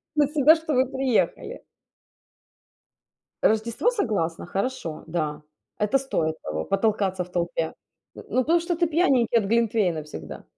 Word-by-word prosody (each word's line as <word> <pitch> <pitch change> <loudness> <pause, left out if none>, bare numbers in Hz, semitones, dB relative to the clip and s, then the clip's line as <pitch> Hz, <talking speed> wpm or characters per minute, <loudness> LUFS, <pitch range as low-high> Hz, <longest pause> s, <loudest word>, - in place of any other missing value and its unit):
на 295 -2 +4
себя, 300 +1 +5
что 320 -2 -3
вы 255 +1 +4
приехали. 265 -3 -1 1.8
Рождество- 225 - +2
согласна. 200 - -1
Хорошо, 195 -4 -3
да. 155 -3 -2 0.4
Это 210 +6 +2
стоит 160 -12 -1
того, 80 0 -4
потолкаться 195 -2 0
в 180 - -15
толпе. 170 -2 -2 0.4
Э, - - -9
ну 255 - +2
потому 335 +6 +3
что 340 +1 -2
ты 340 0 +1
пьяненький 270 -8 +3
от 210 - +1
глинтвейна 210 -7 +1
всегда. 80 - -9
220 Hz, 135 wpm, -25 LUFS, 170-270 Hz, 1.8 s, себя